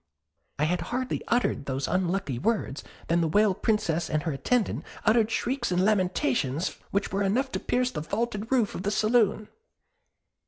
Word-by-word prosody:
I 145 - 0
had 175 +4 +1
hardly 255 +1 -2
uttered 235 - 0
those 135 0 -2
unlucky 180 -7 -1
works, 210 - -1 0.2
than 170 +1 +2
the 165 - +2
Whale 205 +4 +3
Princess 185 -6 0
and 155 -1 0
her 160 - -1
attendant 220 - 0 0.2
uttered 220 0 +4
shrieks 250 -1 -1
and 180 +1 +2
lamentations 185 - +1
which 200 0 -1
were 195 - 0
enough 245 +8 +1
to - - -2
pierce 250 0 0
the 195 - -4
vaulted 215 - -3
roof 240 -6 +2
of - - -5
the 200 - -1
saloon. 215 0 +2
205 Hz, 165 wpm, -27 LUFS, 170-230 Hz, 0.2 s, uttered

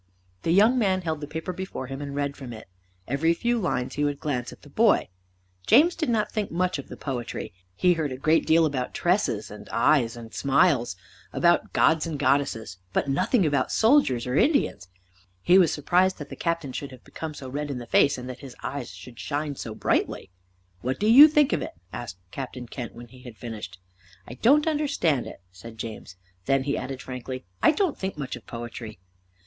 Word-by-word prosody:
The - - -2
young 215 +8 +5
man 190 -4 +2
held 160 -2 -2
the 145 - -5
paper 160 +4 -5
before 190 -7 -5
him, 135 +2 -6
and 140 -1 -5
read 140 0 -1
from 130 -4 -8
it. 110 - -11 0.4
Every 160 +6 +2
few 240 +6 0
lines 125 - -1
he 145 - -1
would 145 -1 -1
glance 125 -5 -2
at - - -15
the - - -14
boy. - - +3 0.6
James 320 +8 +6
did 315 -5 -1
not 220 -3 +1
think 215 -3 -2
much 180 -2 0
of 140 - -8
the - - -8
poetry. 125 -9 -5 0.2
He 180 - +4
heard 160 -4 -2
a 130 - -5
great 155 +4 +2
deal 165 +1 +5
about 130 -5 -2
tresses, 175 - 0
and 105 0 -11
eyes, 120 -2 +2
and 115 -1 -10
smiles, 140 - +2 0.4
about 175 0 +2
Gods 160 0 +3
and 160 -3 -3
Goddesses, 130 -8 0
but 140 - 0
nothing 180 - +2
about 145 -2 +1
soldiers 220 - +3
or 125 +1 -2
Indians. 250 - +2 0.5
He 180 - +5
was 175 -5 +4
surprised 180 +5 +2
that 145 -2 -8
the - - -7
Captain 165 -6 -2
should 140 - -5
have 130 -2 -14
become 160 -2 -7
so 135 - -8
red 145 +3 -4
in 140 - -3
the 120 - -7
face 140 +4 +3
and 125 0 -7
that 125 -1 -7
his 135 -3 -10
eyes 140 -2 -4
should 120 -2 -12
shine 145 0 -3
so 110 -4 -6
brightly. - - -1 0.5
"What 130 +2 -2
do 210 - 0
you 260 +8 +10
think 300 -2 +3
of - - 0
it?" - - -5 0.2
asked 110 -7 -6
Captain 130 -2 -6
Kent, 120 0 -7
when 120 0 -11
he 125 +1 -15
had 120 -4 -11
finished. 105 -5 -7 0.5
"I - - -8
don't 275 - +4
understand 280 - +1
it," - - -10
said 110 +5 -12
James. 110 -4 -7 0.3
Then 135 -1 +3
he 140 +1 -1
added 130 0 -5
frankly, 130 0 -6 0.2
"I - - +6
don't 365 -1 +1
think 190 -4 -4
much 140 -3 -4
of 120 - -13
poetry." 115 -2 -7
140 Hz, 205 wpm, -26 LUFS, 125-175 Hz, 0.6 s, you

